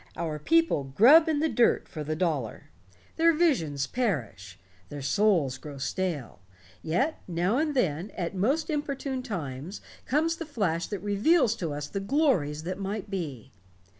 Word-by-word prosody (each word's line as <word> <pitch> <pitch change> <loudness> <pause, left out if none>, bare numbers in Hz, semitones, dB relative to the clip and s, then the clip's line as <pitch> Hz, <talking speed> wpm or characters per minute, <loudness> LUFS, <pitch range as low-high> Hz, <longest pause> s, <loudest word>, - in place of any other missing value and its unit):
"Our 160 -3 -3
people 330 - +2
grub 260 - +6
in 300 -2 +1
the 320 - +3
dirt 245 -6 +2
for 155 - -6
the 155 +1 -3
dollar. 155 -10 -2 0.5
Their 335 +1 +5
visions 165 - +1
perish. 125 - -3 0.3
Their 145 -1 -7
souls 150 -5 +2
grow 145 -1 -9
stale. 145 - -3 0.4
Yet, 265 - -1
now 180 +8 0
and 305 -2 0
then, 180 - 0
at 175 0 -2
most 270 - 0
inopportune 275 -3 -3
times, 165 - -5 0.3
comes 320 +4 +1
the 330 - -5
flash 180 - -1
that 205 -2 -5
reveals 225 - +3
to 165 -6 -3
us 145 0 -4
the 195 - -4
glories 195 - +1
that 185 +3 -4
might 200 +1 -4
be. 150 - -5
190 Hz, 155 wpm, -27 LUFS, -, 0.5 s, grub